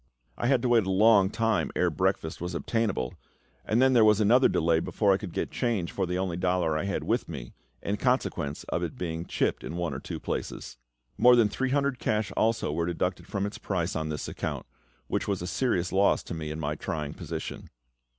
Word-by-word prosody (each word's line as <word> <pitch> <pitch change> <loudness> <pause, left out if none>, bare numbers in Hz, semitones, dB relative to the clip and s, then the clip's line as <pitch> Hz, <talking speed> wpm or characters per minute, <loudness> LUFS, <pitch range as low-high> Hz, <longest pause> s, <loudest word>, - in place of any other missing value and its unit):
I 120 - -1
had 130 -2 +3
to - - +2
wait 115 -5 +4
a - - 0
long 100 0 +5
time 115 -1 0
ere - - +2
breakfast 80 0 -1
was 90 0 -4
obtainable, 100 - -1 0.5
and 110 - +1
then 130 0 +5
there 120 -3 +6
was 105 -1 +5
another 120 +5 +5
delay 80 0 +2
before 100 +4 +2
I - - +2
could 100 -4 -7
get - - -3
change 105 -8 -1
for 95 -2 -1
the 90 +1 -1
only 90 -2 -2
dollar 90 -3 +1
I 80 - -1
had 100 - -2
with 115 -3 -1
me, 65 -7 -7 0.3
in 100 +1 -1
consequence 125 - -1
of - - -1
its - - -3
being 85 -1 -4
chipped - - -1
in 80 - -5
one 85 -4 -2
or 65 - -4
two - - -6
places. - - -5 0.4
More 125 0 +7
than 115 -3 +4
three 130 +5 -1
hundred 140 -2 +1
cash 105 -2 0
also 115 -6 +1
were 85 +2 -1
deducted 90 0 -2
from 100 -1 -2
its 100 - -5
price 90 -2 -2
on 80 -1 -2
this 75 -1 -4
account, - - -4 0.4
which - - -2
was 100 -2 0
a - - -3
serious 90 -4 0
loss 95 +2 +3
to - - -6
me 80 -2 -4
in 75 +1 -5
my 75 -1 -1
trying 75 -2 -4
position. 80 -2 -6
95 Hz, 220 wpm, -28 LUFS, 85-115 Hz, 0.5 s, More